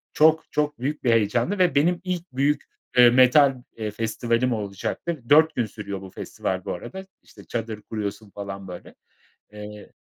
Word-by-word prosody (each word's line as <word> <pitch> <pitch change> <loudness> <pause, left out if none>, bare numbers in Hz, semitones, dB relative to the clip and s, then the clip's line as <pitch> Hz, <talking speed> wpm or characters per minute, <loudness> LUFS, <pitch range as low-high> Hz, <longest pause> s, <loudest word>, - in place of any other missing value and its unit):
Çok, 160 +1 +4
çok 150 -2 -1
büyük 145 +4 -3
bir 120 - +3
heyecandı 115 - +1
ve 180 -2 +3
benim 170 +5 +3
ilk 180 -2 -2
büyük, 140 +3 +1 0.3
eee, 125 -1 +9
metal, 130 +3 +6 0.2
eee, 110 -2 -3
festivalim 115 +3 0
olacaktı. 110 - -4
4 155 +2 +6
gün 120 - +1
sürüyor 100 -2 -7
bu 95 - -9
festival 95 0 -4
bu - - -2
arada, 190 - -8 0.2
işte, - - -16
çadır 115 -2 -4
kuruyorsun 105 -1 -5
falan 100 -1 -7
böyle. 90 -1 -10 0.6
Eee 105 0 -10
120 Hz, 160 wpm, -24 LUFS, 105-150 Hz, 0.6 s, eee